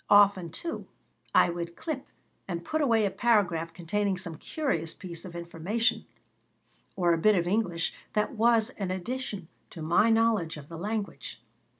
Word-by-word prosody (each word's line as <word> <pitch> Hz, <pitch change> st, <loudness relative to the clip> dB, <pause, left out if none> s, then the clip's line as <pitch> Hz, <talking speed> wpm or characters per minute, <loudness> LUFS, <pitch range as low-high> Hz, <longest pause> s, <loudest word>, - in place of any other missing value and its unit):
Often, 200 Hz, -4 st, +6 dB
too, 335 Hz, -, -5 dB, 0.5 s
I -, -, +6 dB
would 170 Hz, 0 st, -5 dB
clip 290 Hz, -4 st, -4 dB, 0.4 s
and 170 Hz, -2 st, -4 dB
put 315 Hz, -, 0 dB
away 230 Hz, -6 st, +4 dB
a 200 Hz, -, 0 dB
paragraph 180 Hz, -9 st, +2 dB
containing 195 Hz, +3 st, -1 dB
some 175 Hz, -3 st, -5 dB
curious 170 Hz, -, -2 dB
piece 170 Hz, -2 st, -8 dB
of 175 Hz, -2 st, -9 dB
information 170 Hz, +7 st, -1 dB, 0.9 s
or 175 Hz, -3 st, +3 dB
a 165 Hz, -, +1 dB
bit 215 Hz, +4 st, +5 dB
of 175 Hz, -2 st, +2 dB
English 180 Hz, -3 st, 0 dB, 0.2 s
that 210 Hz, +6 st, +1 dB
was 230 Hz, 0 st, +3 dB
an 195 Hz, -2 st, -1 dB
addition 200 Hz, 0 st, -4 dB, 0.2 s
to 165 Hz, -, -8 dB
my 175 Hz, +8 st, +4 dB
knowledge 225 Hz, -8 st, +2 dB
of 145 Hz, -1 st, -11 dB
the 165 Hz, -, -7 dB
language. 200 Hz, -, -4 dB
190 Hz, 160 wpm, -29 LUFS, 170-225 Hz, 0.9 s, Often